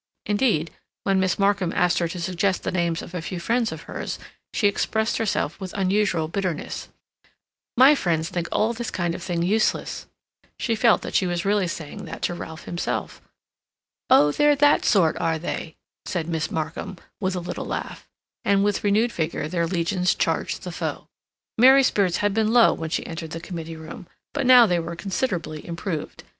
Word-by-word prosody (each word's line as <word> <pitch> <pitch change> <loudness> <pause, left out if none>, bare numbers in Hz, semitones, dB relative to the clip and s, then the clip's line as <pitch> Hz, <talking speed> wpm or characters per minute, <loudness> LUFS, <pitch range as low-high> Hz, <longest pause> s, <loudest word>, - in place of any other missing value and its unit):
Indeed, 205 - +1 0.3
when 195 -1 +2
Miss 185 -1 +1
Markham 200 -3 +2
asked 180 -1 +2
her 170 - +1
to 175 +2 -6
suggest 185 +2 0
the - - -1
names 170 -2 0
of - - -11
a 180 - -3
few 175 +2 -5
friends 230 +5 0
of - - -7
hers, - - -5 0.3
she 205 - +2
expressed 220 +2 0
herself 205 -7 -1
with 190 -2 -7
unusual 190 -4 +1
bitterness: 175 -2 -3 0.9
"My 265 +4 +8
friends 165 - 0
think 175 -1 -3
all 220 +2 +1
this 235 0 -4
kind 175 -2 -1
of 175 - -6
thing 170 -1 -2
useless." 215 +5 0 0.5
She 230 - 0
felt 225 0 +3
that - - -6
she 185 - +2
was 175 0 -2
really 200 -2 +2
saying 160 -3 -6
that - - -8
to - - 0
Ralph 160 -2 -8
himself. 175 - -4 0.9
"Oh, 150 0 +6
they're 295 - +4
that 290 +1 +4
sort, 175 -7 +3
are 165 -1 0
they?" 160 0 -5 0.3
said 170 -3 -2
Miss 160 -2 -2
Markham, 160 +4 -4 0.2
with 190 -2 -1
a - - -1
little 175 - -5
laugh; - - -5 0.4
and 200 0 +3
with 205 +1 0
renewed 215 +4 +2
vigor 160 -3 -2
their 170 0 -1
legions 180 +1 +1
charged - - -1
the - - -5
foe. - - -4 0.5
Mary's 265 +2 +7
spirits 190 -4 +1
had 205 - +2
been 220 0 +1
low 235 -1 +6
when 160 -1 -5
she - - -2
entered 165 -1 -6
the 165 - -5
committee 165 -1 -7
room; 160 +3 -10 0.3
but 280 -3 -1
now 250 -2 +9
they 175 -4 +1
were 170 +1 -5
considerably 180 - -3
improved. 170 -2 -5
180 Hz, 185 wpm, -24 LUFS, 170-210 Hz, 0.9 s, now